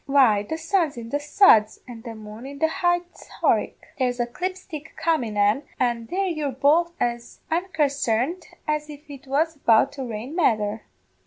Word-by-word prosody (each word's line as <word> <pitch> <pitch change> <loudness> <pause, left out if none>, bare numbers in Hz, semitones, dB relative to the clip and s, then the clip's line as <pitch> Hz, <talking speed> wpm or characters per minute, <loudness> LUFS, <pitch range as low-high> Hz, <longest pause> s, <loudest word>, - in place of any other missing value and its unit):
"'Why, 260 -7 +5
the 315 +10 -4
sun's 330 -5 0
in 230 -1 -7
the 290 - -1
suds 290 - +5
and 235 -2 -10
the 230 -1 -7
moon 215 +3 -10
in 280 0 -8
the 320 - +2
high 350 +2 +1 0.4
Horicks; - - +2 0.2
there's 250 -1 0
a 240 - +2
clipstick 330 +2 -6
comin' 255 -11 0
an, 205 +6 +3 0.2
an' 235 -2 0
there 390 +6 -1
you're 310 -6 -2
both 305 +6 +3
as 235 -1 -3
unconsarned 310 -3 0 0.2
as 300 0 -1
if 295 +1 -11
it 275 -1 -11
was 310 +4 0
about 225 -5 +4
to 275 -2 -6
rain 240 +5 -6
mether. 220 - +1
275 Hz, 170 wpm, -24 LUFS, 235-320 Hz, 0.4 s, Why